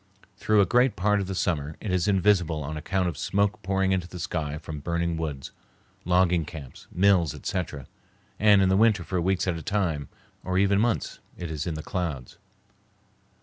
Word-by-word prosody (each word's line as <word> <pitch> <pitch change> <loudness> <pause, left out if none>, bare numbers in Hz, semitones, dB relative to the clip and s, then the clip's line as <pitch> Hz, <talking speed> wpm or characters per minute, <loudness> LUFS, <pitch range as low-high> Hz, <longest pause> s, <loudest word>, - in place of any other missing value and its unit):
Through 105 +1 +3
a - - +4
great 125 +3 +3
part 105 +3 +2
of 95 - -3
the 95 - -4
summer 80 -4 -1
it 105 - -4
is 90 -1 +1
invisible 90 -5 +2
on 75 +3 -5
account 90 +4 -1
of 80 -3 -4
smoke 100 +1 0
poured 95 0 0
into 90 -2 0
the 90 - -9
sky 75 -4 -3
from 75 0 -7
burning 85 +2 -1
woods, 75 -5 -5 0.5
logging 90 -1 +3
camps, 75 -5 -10
mills, 90 -5 +3
etc., 80 -8 -4 0.5
and 105 -2 +6
in 95 0 +3
winter 110 -5 +4
for 90 +1 -2
weeks 95 +1 +1
at 85 -2 0
a - - -8
time, 80 -7 -1 0.3
or 95 0 -1
even 100 +1 +3
months, 115 -1 -1 0.2
it 85 -2 -5
is 75 0 -4
in 80 - -2
the 75 - -6
clouds. 80 -9 -4
90 Hz, 185 wpm, -26 LUFS, 80-100 Hz, 0.5 s, and